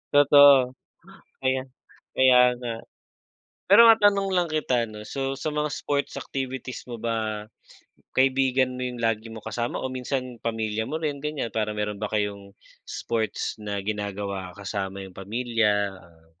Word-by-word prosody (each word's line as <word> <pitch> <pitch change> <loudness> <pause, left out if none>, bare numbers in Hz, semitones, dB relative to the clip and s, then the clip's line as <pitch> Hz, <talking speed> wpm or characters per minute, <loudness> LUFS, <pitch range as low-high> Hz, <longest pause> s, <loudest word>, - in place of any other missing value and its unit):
Totoo, 140 -3 +7 0.7
kaya 130 0 0 0.5
kaya 130 -1 +6 0.2
nga. 120 -2 -5 0.9
Pero 220 +4 +9
matanong 205 -3 +5
lang 175 -2 +2
kita 125 -7 0
ano, 105 0 -9
so 135 +3 -3
sa 150 +3 -3
mga 150 0 0
sports 140 0 -2
activities 130 -1 -5
mo 120 - -5
ba, 110 -2 -2 0.7
kaibigan 130 -1 +3
mo 125 - -6
'yung 125 -1 -3
lagi 115 -1 -1
mong 110 -1 -10
kasama 120 +2 -3
o 130 0 -4
minsan 125 -2 -4
pamilya 110 -1 -2
mo 155 - -2
rin 145 -3 -3
ganyan 150 -6 -3
para 110 -1 0
meron 105 0 -3
ba 105 - -2
kayong 100 -2 -2 0.3
sports 110 -1 -3
na 105 -1 -3
ginagawa 100 -2 -3
kasama 100 -1 -4
yung 95 - -13
pamilya, 105 -1 0
ah, 85 -2 -21
120 Hz, 145 wpm, -25 LUFS, 105-135 Hz, 0.9 s, Pero